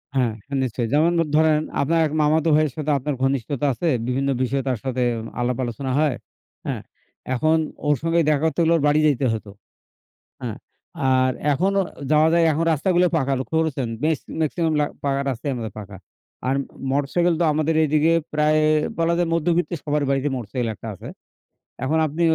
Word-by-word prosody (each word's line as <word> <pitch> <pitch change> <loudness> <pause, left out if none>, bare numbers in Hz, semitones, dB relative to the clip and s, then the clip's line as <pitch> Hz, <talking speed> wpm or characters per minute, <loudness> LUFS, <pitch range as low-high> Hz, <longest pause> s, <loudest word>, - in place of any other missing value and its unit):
হ্যাঁ, 125 -4 +1 0.3
নিশ্চয়ই। 120 -1 -2
যেমন 155 +4 +4 0.2
ধরেন 155 -1 +4 0.2
আপনার 165 +4 +1
এক - - -8
মামাতো 155 +2 +2
ভাইয়ের 155 -3 +2
সাথে 155 -1 -1
আপনার 140 +1 -3
ঘনিষ্ঠতা 135 +1 0
আছে। 125 +9 -3 0.2
বিভিন্ন 135 +2 0
বিষয়ে 135 +1 0
তার 125 -4 -1
সাথে 130 -1 -1 0.4
আলাপ 120 0 0
আলোচনা 125 +2 -4
হয়, 150 -4 +2 0.5
হ্যাঁ? - - -3 0.5
এখন 155 +5 +2 0.3
ওর 150 - +4
সঙ্গে 165 +1 +1
দেখা 145 -2 +2
করতে 160 - 0
হলে 165 0 +3
ওর - - -2
বাড়ি 145 +1 +3
যাইতে 140 -3 +2
হতো, 110 -2 -6 0.9
হ্যাঁ? - - -4 0.5
আর 130 0 +3 0.2
এখনও 195 +7 +1 0.3
যাওয়া 155 +1 +5
যায়। 170 0 +4
এখন 160 +3 0
রাস্তাগুলো 175 +4 +2
পাকা 140 -3 0
লক্ষ্য 145 +4 -3
করেছেন? 140 -6 -1
বেশ 155 -2 +1 0.2
maximum 160 +1 0
লা - - +3 0.2
পাকা 140 -1 +1
রাস্তাই 130 +3 -3
আমাদের 115 -4 -5
পাকা। 100 -2 -9 0.5
আর 130 - +2 0.4
motorcycle 145 +6 +1
তো - - +3
আমাদের 155 +1 0
এইদিকে 155 +1 +3 0.2
প্রায় 155 0 +3 0.4
বলা 165 0 +2
যায় 175 -1 +1
মধ্যবিত্ত 170 +1 +1
সবার 150 0 0
বাড়িতে 135 +1 +1
motorcycle 120 0 -3
একটা 115 - -9
আছে। 95 - -10 0.8
এখন 155 +5 +1
আপনি 155 +3 -3
150 Hz, 170 wpm, -22 LUFS, 130-160 Hz, 0.9 s, যাওয়া